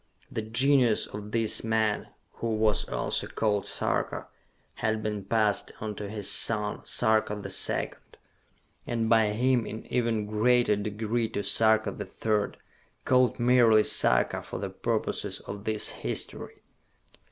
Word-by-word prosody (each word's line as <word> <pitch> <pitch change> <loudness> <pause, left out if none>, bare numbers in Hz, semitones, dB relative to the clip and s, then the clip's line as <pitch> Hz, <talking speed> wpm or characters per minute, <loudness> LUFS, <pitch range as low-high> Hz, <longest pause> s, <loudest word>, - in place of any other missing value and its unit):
The 110 - -3
genius 120 +1 +3
of 105 0 -8
this 115 -1 0
man, 110 -2 0 0.3
who 115 -1 -2
was 110 -1 +1
also - - -1
called 105 -3 -1
Sarka, - - -2 0.6
had 110 0 0
been 105 -2 -3
passed 105 0 0
on 110 -1 -4
to 105 0 -7
his 105 -1 -1
son, 105 -2 +2
Sarka 110 -1 +1
the 105 - -7
Second, - - -2 0.7
and 115 -1 -1
by 110 -1 +4
him 120 +2 +1
in 110 - -7
even 115 -3 0
greater 110 +1 +2
degree 110 +3 -2
to 100 - -3
Sarka 110 +2 +3
the 100 - -6
Third... 105 +2 -2 0.5
called 125 -1 +3
merely 120 -3 +5
Sarka - - +3
for - - -7
the - - -5
purposes - - -2
of 100 +1 -8
this 110 -1 +1
history. - - -5
110 Hz, 140 wpm, -27 LUFS, 105-115 Hz, 0.7 s, merely